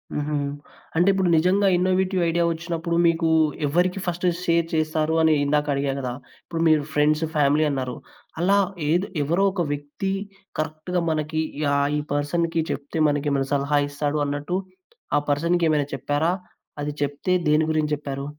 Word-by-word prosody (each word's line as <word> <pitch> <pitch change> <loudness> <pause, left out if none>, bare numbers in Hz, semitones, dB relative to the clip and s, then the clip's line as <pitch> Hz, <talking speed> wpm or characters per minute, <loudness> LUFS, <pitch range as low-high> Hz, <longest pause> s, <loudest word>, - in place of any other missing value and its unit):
హుహు. 150 0 -1 0.6
అంటే, 175 +3 +4
ఇప్పుడు 190 -2 +1
నిజంగా 185 +5 +3
ఇన్నోవేటివ్ 185 +1 +1
ఐడియా 170 +1 +1
ఒచ్చినప్పుడు 170 0 -3
మీకు 165 0 +2 0.4
ఎవరికి 180 +6 +1
ఫస్ట్ 175 0 -2 0.2
షేర్ 170 0 +2
చేస్తారు 155 0 0
అని 160 -1 +5
ఇందాక 150 +1 +1
అడిగా 140 0 0
కదా! 125 -2 -3 0.3
ఇప్పుడు 165 -1 -3
మీరు 155 -2 +4
ఫ్రెండ్స్, 150 +2 +2
ఫ్యామిలీ 150 +1 +3
అన్నారు. 130 -3 -3 0.5
అలా, 195 +3 +4 0.3
ఏద్ 175 +5 +2 0.2
ఎవరో 170 +7 +1
ఒక 175 -3 -1
వ్యక్తి 145 +7 -4 0.5
కరెక్ట్‌గా 155 +3 -2
మనకి 155 +1 -1 0.2
ఈ - - 0
ఆ - - +3 0.2
ఈ - - -1
పర్సన్‌కి 165 +3 0
చెప్తే 145 +3 -4
మనకి 145 0 -1
ఏమైనా 135 -1 0
సలహా 145 +1 +2
ఇస్తాడు 145 +1 -1
అన్నట్టు, 145 +5 -2 0.6
ఆ - - +4
పర్సన్‌కి 170 +4 +2
ఏమైనా 150 -2 +1
చెప్పారా? 145 +6 0 0.5
అది 145 0 -2
చెప్తే 145 +5 -2 0.2
దేని 155 +1 +4
గురించి 155 -1 0
చెప్పారు? 140 -1 -5
155 Hz, 155 wpm, -24 LUFS, 145-170 Hz, 0.6 s, అని